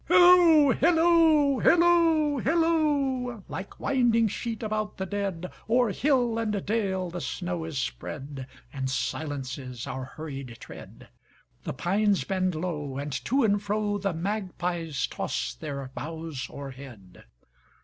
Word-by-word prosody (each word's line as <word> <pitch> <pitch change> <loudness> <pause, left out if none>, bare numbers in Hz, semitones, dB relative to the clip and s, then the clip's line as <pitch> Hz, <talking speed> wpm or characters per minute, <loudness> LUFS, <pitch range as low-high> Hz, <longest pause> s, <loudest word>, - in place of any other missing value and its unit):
Hilloo, 350 -5 +7
hilloo, 320 -4 +4
hilloo, 330 -4 +4
hilloo! 285 - +1
Like 195 - -7
winding 240 -4 +2
sheet 230 +2 -4
about 215 -1 -3
the 190 - -3
dead, 190 -3 -3 0.2
O'er 240 -1 +3
hill 245 -2 +1
and 210 -3 -2
dale 190 -4 -1
the 175 0 -5
snow 175 -2 -3
is 160 -3 -5
spread, 135 0 -5 0.3
And 135 -2 -3
silences 130 -2 -4
our 130 -1 -5
hurried 135 -5 -8
tread; - - -12 0.6
The - - -3
pines 200 +8 +1
bend 185 -2 -1
low, 150 -5 -4
and 140 0 -4
to 270 +2 +2
and 205 -2 +3
froThe 205 -3 -1
magpies 175 -5 -2
toss - - -3
their 140 -4 -6
boughs 160 -4 -5
o'erhead. 130 -9 -10
195 Hz, 120 wpm, -27 LUFS, -, 0.6 s, Hilloo